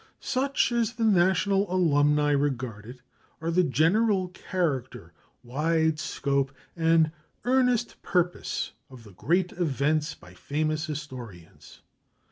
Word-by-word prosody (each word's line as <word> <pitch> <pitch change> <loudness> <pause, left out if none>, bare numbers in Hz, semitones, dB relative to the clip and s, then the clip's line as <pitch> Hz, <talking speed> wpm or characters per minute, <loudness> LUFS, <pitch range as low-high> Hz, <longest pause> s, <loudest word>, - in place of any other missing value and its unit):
Such, 270 0 0
as 235 -1 0
the 230 -1 -3
National 195 -1 +3
Alumni 150 -4 +3
regard 130 -7 -1
it, 125 +1 -11 0.4
are 165 +1 -2
the 180 +2 +3
general 185 - +2
character, 170 -8 -3 0.3
wide 160 +4 0
scope, 140 -2 -1 0.2
and 165 -1 +3 0.3
earnest 250 -2 +1
purpose 175 -1 -1 0.2
of 130 -3 -13
THE 105 - -14
GREAT 175 - 0
EVENTS 150 -1 0
BY 90 - -16
FAMOUS 155 - -2
HISTORIANS. 125 - -9
155 Hz, 110 wpm, -27 LUFS, 140-185 Hz, 0.4 s, National